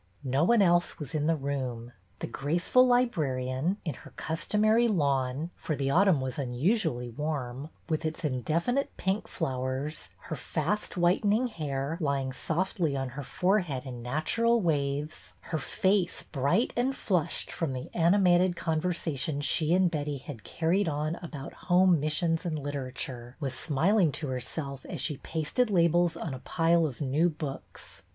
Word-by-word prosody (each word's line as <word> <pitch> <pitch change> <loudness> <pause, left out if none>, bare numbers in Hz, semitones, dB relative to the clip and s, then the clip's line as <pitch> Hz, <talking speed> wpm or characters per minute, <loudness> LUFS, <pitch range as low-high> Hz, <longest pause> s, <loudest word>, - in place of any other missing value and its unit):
No 135 +2 +1
one 220 +3 +5
else 175 -1 +3
was 150 -1 -6
in 150 -1 0
the 165 - +3
room. 130 -5 -3 0.3
The - - -1
graceful 175 - +2
librarian, 155 - +1
in 155 - -1
her - - -13
customary 215 +8 +2
lawn, 140 - 0
— - - -35
for 155 - -3
the 135 -1 -1
au 180 +7 +5
tumn 185 -8 +4
was 130 +1 -3
unusually 135 - 0
warm, 140 0 -4
— - - -35
with 160 -1 -1
its 160 0 -3
indefinite 165 - 0
pink 190 +3 -1
flowers, 130 +3 -3
her 160 - -5
fast 165 +9 -2
whitening 205 +7 +3
hair 150 -4 -3
lying 140 -3 0
softly 165 -1 -1
on 135 -1 -2
her 140 +4 -6
forehead 175 -3 0
in 125 -2 -7
natural 155 - +1
waves, 150 -4 -1 0.2
her 160 - 0
face 190 +5 +1
bright 140 - +1
and 260 +3 +1
flushed 175 - -1
from 160 -5 -2
the 130 -1 -5
animated 175 0 +4
conversation 160 -3 -1
she 150 +2 +1
and 180 -1 +4
Betty 145 -2 -2
had 130 -4 -9
carried 170 +3 +1
on 150 +1 -1
about 150 -6 -8 0.2
Home 180 -1 +5
Missions 160 +2 0
and 165 -4 -2
Literature, 130 -3 -5
was 135 -4 -2
smiling 165 - +2
to 150 - -4
herself 130 +2 -4
as - - -5
she 150 -4 -1
pasted 160 - -1
labels 175 -2 +3
on 155 - -4
a 130 - -6
pile 165 +2 +2
of 135 -2 -8
new 145 +5 +2
books. 150 -4 -8
155 Hz, 160 wpm, -29 LUFS, 135-175 Hz, 0.3 s, one